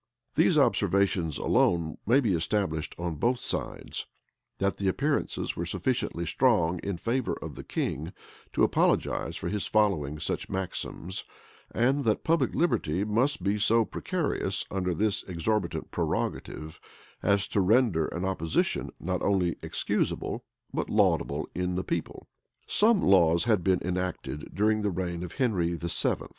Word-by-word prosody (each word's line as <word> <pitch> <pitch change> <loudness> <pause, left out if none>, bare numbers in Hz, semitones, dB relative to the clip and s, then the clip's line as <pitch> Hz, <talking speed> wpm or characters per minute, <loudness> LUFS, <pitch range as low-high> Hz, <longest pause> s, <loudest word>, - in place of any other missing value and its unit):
These - - +4
observations 90 -5 +2
alone 85 -2 +1
may 125 +5 +5
be 110 -7 +1
established 80 -2 -1
on 85 -2 -3
both 125 - +2
sides, - - -4 0.5
that 100 0 0
the 100 - -1
appearances 140 +9 0
were 85 - -3
sufficiently 90 -1 -1
strong 90 -5 +2
in 100 0 -3
favor 115 +7 -1
of - - -6
the - - -8
king 80 +5 -3 0.4
to - - +2
apologize - - +1
for - - -4
his 105 -1 -1
following 90 -10 +1
such - - -2
maxims; 95 -1 -4 0.5
and 130 +6 +1
that 110 - +1
public 160 -5 +2
liberty 95 - +1
must 115 +2 +1
be 100 +2 +1
so 115 +2 +4
precarious - - -1
under 90 -2 -1
this 105 +3 +1
exorbitant 95 +1 -1
prerogative, 80 0 -3 0.4
as 100 -1 +2
to 100 - +2
render 100 -5 +3
an 90 +2 -3
opposition 80 -4 0
not 90 0 -2
only 95 -4 +1
excusable, - - -2 0.3
but - - -2
laudable - - +2
in 90 0 -1
the 90 - -1
people.[*] - - -4 0.4
Some 215 -1 +4
laws 85 -3 +5
had 110 -6 +2
been 95 -2 +2
enacted, 90 -4 -3
during 110 +2 +2
the 105 - +1
reign 85 -2 -3
of 90 -2 -6
Henry 90 -10 +1
VII. 85 0 0
95 Hz, 145 wpm, -28 LUFS, 85-110 Hz, 0.5 s, may